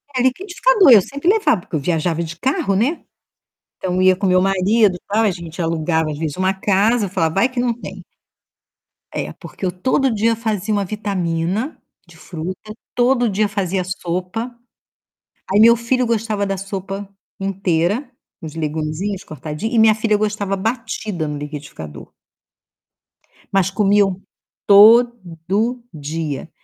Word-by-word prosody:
É, 250 - +1
liquidificador. 370 - +3
Eu 215 -5 +9
sempre 280 - -2
levava 410 - +3
porque 175 - -7
eu 155 - +1
viajava 165 +2 -1
de 165 +1 -7
carro, 265 - 0
né. 255 - 0 0.8
Então 180 -1 -2
eu 185 - +2
ia 185 0 +5
com 195 +1 -1
meu 185 0 +4
marido, 195 +1 +2
tal. 215 +3 +2
A 210 - +3
gente 170 -1 -8
alugava 160 -1 0
às 145 - -5
vezes 155 -3 -3
uma 185 +1 +1
casa. 205 +3 +2
Eu - - -8
falava: 165 -4 0
"Vai 235 +6 +4
que 250 -1 -3
não 245 -1 +1
tem". - - -9 1.1
É, - - -3
porque - - -13
eu 180 - 0
todo 255 +9 +1
dia 225 +2 +2
fazia 215 -2 -2
uma 205 - +1
vitamina 195 - -2 0.3
de - - -17
fruta, 185 +5 -7 0.2
todo 245 -1 +3
dia 205 +2 +1
fazia 195 -2 -1
sopa. 185 +6 -4 1.0
Aí, 205 - +4
meu 235 +1 +8
filho 245 +2 0
gostava 220 -3 -1
da 195 - -1
sopa 195 +1 -6 0.3
inteira, 195 - 0 0.3
uns 160 -2 -7
legumezinhos 160 +5 -3
cortadinhos, 155 - -5
e - - +4
minha 220 -1 +6
filha 220 -1 +1
gostava 210 -2 -1
batida 210 -5 -3
no 150 0 -4
liquidificador. 145 - -8 1.4
Mas 195 -1 +2
comiam 195 -1 +2 0.4
todo 215 0 +4
dia. 155 0 -4
195 Hz, 150 wpm, -19 LUFS, 175-225 Hz, 1.4 s, Eu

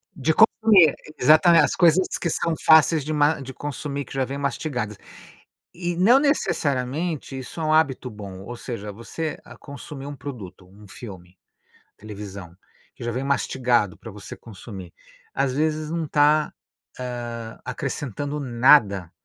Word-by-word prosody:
De 160 0 +1
co 220 - +8 0.2
comer 195 -9 +6 0.2
exatamen 160 +5 +6
as 150 - +1
coisas 180 +1 +4
que 170 - -1
são 165 +1 -1
fáceis 160 -1 +6
de 155 - -3
ma 150 0 +2
de 135 0 -8
consumir 140 0 -5
que - - -12
já 135 -1 0
vem 135 +2 -5
mastigadas, 125 -6 -3 0.8
e 175 -1 -3
não 225 +9 +5
necessariamente 150 - -1
isso 130 +5 -8
é - - -1
hábito 140 -5 +2
bom. 100 -3 -9
Ou 120 +3 -7
seja, 105 -4 -6
você 150 +9 -5
a - - -13
consumir 140 -1 -9
um 145 - -6
produto, 105 -9 -9
um 100 +2 -16
filme, 95 -4 -11 0.6
televisão, 100 -4 -9 0.4
que - - -10
já 120 - -2
vem 130 +3 -3
mastigado 125 -7 0
pra - - -10
você - - -10
consumir, 95 -4 -11 0.4
as 135 -1 0
vezes 155 +1 -1
não 165 0 -2
está, 150 +1 +2 0.5
hã, 120 -2 -6
acrescentando 140 +2 -4
nada 120 - +3
135 Hz, 150 wpm, -23 LUFS, 115-155 Hz, 0.8 s, co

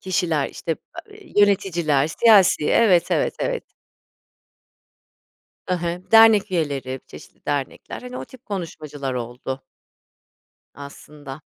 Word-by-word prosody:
kişiler, 175 -6 0
işte 165 - -4
ı - - -6 0.4
eee, 410 -5 -17
yöneticiler, 170 -8 +2
siyasi. 195 -3 +4
Evet, 190 -7 +4
evet, - - +1
evet. - - -2 2.1
I 185 - 0
hı, 175 +1 -5
dernek 225 -3 +6
üyeleri, 140 -6 -2
çeşitli - - -15
dernekler, 145 -2 -4
hani, 250 0 -8
o - - -6
tip 260 -1 -17
konuşmacılar 150 - -5
oldu. 125 +2 -5 1.1
Aslında. 140 0 -11
170 Hz, 110 wpm, -22 LUFS, 140-200 Hz, 2.1 s, dernek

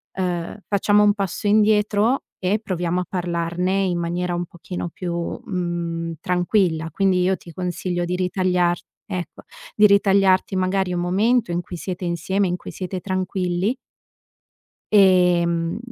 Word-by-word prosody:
ehm, 180 -1 -2
facciamo 205 +1 +3
un 205 0 +5
passo 200 0 -3
indietro, 210 +3 +3 0.2
e 190 +4 +1
proviamo 180 -3 -2
a - - -5
parlarne 180 +1 -1
in 175 -2 0
maniera 175 +1 -2
un 175 - -2
pochino 175 +1 -6
più, 175 +1 -5 0.3
mhmm, 170 -2 -3
tranquilla. 175 -3 +1
Quindi 190 +1 +2
io 185 +1 +2
ti 170 - -13
consiglio 180 0 -2
di 180 +1 -2
ritagliar 180 -1 +1 0.3
ecco, 175 -5 -6 0.3
di 210 0 +7
ritagliarti 195 -1 +3
magari 185 0 0
un 175 - -1
momento 205 +4 +2
in 175 +1 -1
cui 175 - -8
siete 180 +1 -5
insieme, 190 +3 0
in 180 - -1
cui - - -9
siete 185 0 -5
tranquilli 185 +2 -1 1.2
ehm, 175 -4 +4
180 Hz, 140 wpm, -22 LUFS, 175-195 Hz, 1.2 s, di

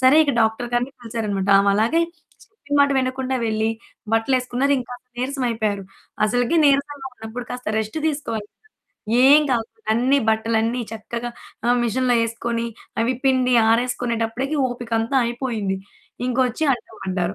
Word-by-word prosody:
సరే 260 +4 +6
ఇక 280 - 0
డాక్టర్ 225 +2 +1
గారిని 245 +3 0
పిలిచారు 230 -2 -4
అన్నమాట, 195 -1 -1
ఆమలాగే 215 +11 +3 0.4
చెప్పిన 290 -10 -7
మాట 280 - +2
వినకుండా 260 0 -1
వెళ్లి, 220 0 0 0.4
బట్టలేసుకున్నారు 255 +3 +1
ఇంక 245 - -10 0.3
నీరసం 265 +1 -2
అయిపోయారు. 215 -3 -1 0.4
అసలకి 245 +8 +1
నీరసంగా 280 0 +1
ఉన్నప్పుడు 240 +2 -7
కాస్త 250 -2 -5
రెస్ట్ 220 +8 -4
తీసుకోవాలి 230 -8 -3
కదా! - - -61 0.7
ఏం 285 +3 +8
కాకుండా 235 -3 0 0.2
అన్ని 255 +5 +3
బట్టలన్నీ 225 +2 +1
చక్కగా 235 +2 -5 0.4
ఆహ్, 245 +1 +4
మెషిన్‌లో 245 +2 +1
ఎసుకొని 230 0 -3 0.4
అవి 235 +3 +2
పిండి 255 -1 +3 0.2
ఆరేసుకునేటప్పుడికి 240 +2 0
ఓపికంత 235 -1 -2
అయిపోయింది. 235 -5 -2 0.5
ఇంకొచ్చి 255 +2 0
అడ్డం 240 -2 -6
పడ్డారు, 185 -1 -2
240 Hz, 130 wpm, -22 LUFS, 225-260 Hz, 0.7 s, ఏం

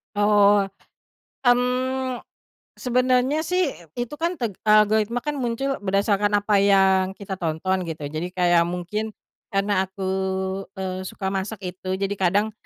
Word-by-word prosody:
Oh. 205 0 +5 0.8
Mmm, 250 +1 +1 0.5
sebenarnya 255 +3 +2
sih 360 -1 0 0.2
itu 245 +2 -3
kan 340 +2 0
teg 235 -7 -2 0.2
algoritma 215 +2 +4
kan 295 -1 -2
muncul 260 +3 -2
berdasarkan 205 +1 +1
apa 205 0 +2
yang 195 -1 +3
kita 200 -1 -8
tonton 175 +3 -1
gitu, 160 -2 -5
jadi 155 +5 -3
kayak 175 -2 +3
mungkin 180 +5 -3 0.4
karena 195 -1 0
aku, 190 0 -7 0.7
eee, 185 -1 -3
suka 190 -1 -4
masak 195 +1 -4
itu 185 +1 -4
jadi 195 +1 -2
kadang, 200 +4 +2
205 Hz, 130 wpm, -23 LUFS, 190-245 Hz, 0.8 s, Oh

